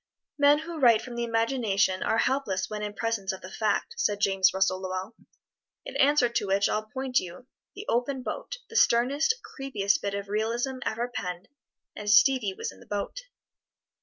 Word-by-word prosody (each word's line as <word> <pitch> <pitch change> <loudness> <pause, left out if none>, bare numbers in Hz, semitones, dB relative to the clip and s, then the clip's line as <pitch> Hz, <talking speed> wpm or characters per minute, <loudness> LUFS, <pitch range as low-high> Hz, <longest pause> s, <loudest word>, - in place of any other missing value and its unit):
"Men 285 +1 +6
who 325 +1 -6
write 230 -5 +5
from 245 -1 -8
the 235 - -2
imagination 225 -5 +1
are 225 - +1
helpless 245 -9 0
when 210 0 -5
in 210 0 -4
presence 225 -4 -1
of 190 - -8
the 185 - -10
fact," 215 0 -1
said 205 -1 +1
James 195 -1 +3
Russell 190 -1 +1
Lowell. 185 +2 -4 0.7
In - - -8
answer 285 -2 +4
to 235 -3 -2
which 195 +1 +2
I'll 215 0 -2
point 260 +1 0
you 180 +6 -9 0.3
"The 405 +2 -8
Open 255 +2 0
Boat," - - -5
the 455 - -13
sternest, 280 - +3
creepiest 235 -7 -1
bit 200 0 -2
of 200 0 -5
realism 230 +5 -1
ever 235 +2 -1
penned, 180 -8 -6 0.5
and 210 0 -5
Stevie 215 -2 +4
was - - -4
in - - -17
the - - -17
boat. 210 - -4
225 Hz, 180 wpm, -27 LUFS, 200-260 Hz, 0.7 s, Men